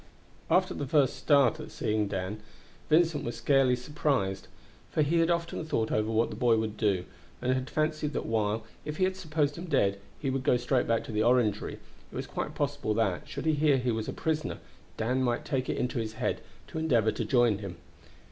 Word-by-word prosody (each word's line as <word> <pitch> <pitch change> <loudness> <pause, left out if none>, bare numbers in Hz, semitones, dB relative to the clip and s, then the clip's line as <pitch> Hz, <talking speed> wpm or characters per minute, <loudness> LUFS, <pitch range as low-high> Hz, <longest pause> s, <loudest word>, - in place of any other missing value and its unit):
After - - +3
the 145 - -4
first 140 -2 +3
start 145 +1 +3
at 155 - -7
seeing 105 -1 -1
Dan, 100 +1 -3 0.5
Vincent 160 -1 +3
was 120 - -3
scarcely 130 +1 +3
surprised, 125 -7 -1 0.4
for 155 - +2
he 165 +4 +2
had 165 0 +3
often 170 -1 -1
thought 115 -8 -1
over 110 0 +1
what 115 +1 +1
the - - -5
boy 120 -3 +3
would 110 -1 -2
do, 100 -5 +1 0.3
and 130 - +1
had 130 0 -2
fancied 155 -1 -1
that - - -2
while, 110 0 0 0.2
if 150 +1 -5
he 185 0 +2
supposed 155 -5 -1
him 175 - -5
dead, 100 - +2 0.2
he 135 -3 -1
would 135 0 -1
go 125 - +4
straight 125 +1 +1
back 115 -1 +1
to - - -7
the 105 0 0
Orangery, 115 -3 +2
it - - -19
was - - -3
quite - - -4
possible 105 - -1
that, 100 -6 0
should 140 +3 -5
he 160 - +3
hear 145 -2 +3
that 125 - -3
he 125 - +2
was 110 -1 -2
a - - -2
prisoner, 160 -1 -2 0.4
Dan 125 +4 0
might 120 -2 0
take 130 -1 -1
it - - -1
into 125 -1 -1
his 110 -1 -3
head 120 +3 -2 0.3
to 160 - -4
endeavor 120 -9 +3
to - - -3
join 120 -6 +3
him. 95 -5 -7
125 Hz, 215 wpm, -29 LUFS, 110-150 Hz, 0.5 s, go